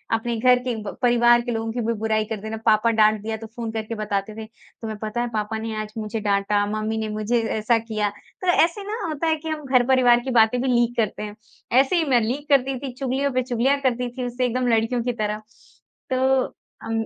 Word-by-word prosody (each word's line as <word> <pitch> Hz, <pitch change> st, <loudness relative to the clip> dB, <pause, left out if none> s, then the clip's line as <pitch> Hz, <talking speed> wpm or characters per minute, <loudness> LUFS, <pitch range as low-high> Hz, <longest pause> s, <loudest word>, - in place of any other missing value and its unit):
अपने 235 Hz, +1 st, -2 dB
घर 250 Hz, +1 st, +5 dB
के 250 Hz, -2 st, -2 dB
ब 205 Hz, -, -6 dB
परिवार 240 Hz, -1 st, +5 dB
के 240 Hz, 0 st, -4 dB
लोगों 225 Hz, 0 st, -2 dB
की 240 Hz, +1 st, -3 dB
भी 230 Hz, -, +1 dB
बुराई 215 Hz, -1 st, 0 dB
कर 220 Hz, 0 st, -4 dB
देना, 220 Hz, +1 st, -5 dB
पापा 220 Hz, +1 st, +4 dB
डाँट 215 Hz, -1 st, +3 dB
दिया 220 Hz, +1 st, -3 dB
तो 225 Hz, 0 st, -9 dB
फ़ोन 230 Hz, 0 st, -6 dB
करके 220 Hz, 0 st, -4 dB
बताते 210 Hz, 0 st, -3 dB
थे। 220 Hz, 0 st, -7 dB
तुम्हे 220 Hz, 0 st, -10 dB
पता 215 Hz, +2 st, -2 dB
है 240 Hz, -, -1 dB
पापा 215 Hz, +1 st, -2 dB
ने 220 Hz, 0 st, -4 dB
आज 215 Hz, 0 st, -8 dB
मुझे 215 Hz, 0 st, -3 dB
डाँटा, 205 Hz, 0 st, +1 dB
मम्मी 215 Hz, +1 st, -2 dB
ने 220 Hz, -1 st, -2 dB
मुझे 215 Hz, +3 st, 0 dB, 0.2 s
ऐसा 225 Hz, +2 st, +2 dB
किया। 215 Hz, -2 st, -2 dB, 0.3 s
तो 370 Hz, -, -4 dB, 0.2 s
ऐसे 345 Hz, +4 st, -1 dB
ना 450 Hz, -, -3 dB
होता 315 Hz, +1 st, -2 dB
है 320 Hz, -, +3 dB
कि 320 Hz, +1 st, -7 dB
हम 305 Hz, -2 st, -4 dB
घर-परिवार 250 Hz, -1 st, +4 dB
की 265 Hz, -, -3 dB
बातें 235 Hz, +1 st, +4 dB
भी 265 Hz, -, -1 dB
लीक 240 Hz, -1 st, +2 dB
करते 215 Hz, -1 st, -1 dB
हैं। 210 Hz, 0 st, -7 dB, 0.4 s
ऐसे 275 Hz, +7 st, +3 dB
ही 335 Hz, -, +3 dB
मैं 245 Hz, -2 st, +4 dB
लीक 270 Hz, +7 st, -3 dB
करती 270 Hz, -1 st, +3 dB
थी, 270 Hz, -2 st, -5 dB
चुगलियों 270 Hz, +2 st, -1 dB
पे 255 Hz, 0 st, +1 dB
चुगलियाँ 255 Hz, +3 st, +1 dB
करती 250 Hz, -2 st, 0 dB
थी 250 Hz, -, -2 dB
उससे 245 Hz, +1 st, -1 dB
एकदम 250 Hz, +1 st, 0 dB
लड़कियों 230 Hz, +1 st, +1 dB
की 245 Hz, 0 st, -1 dB
तरह। 210 Hz, 0 st, -2 dB, 0.7 s
तो 260 Hz, 0 st, +3 dB, 0.4 s
अम, 225 Hz, 0 st, -2 dB
235 Hz, 230 wpm, -23 LUFS, 220-255 Hz, 0.7 s, घर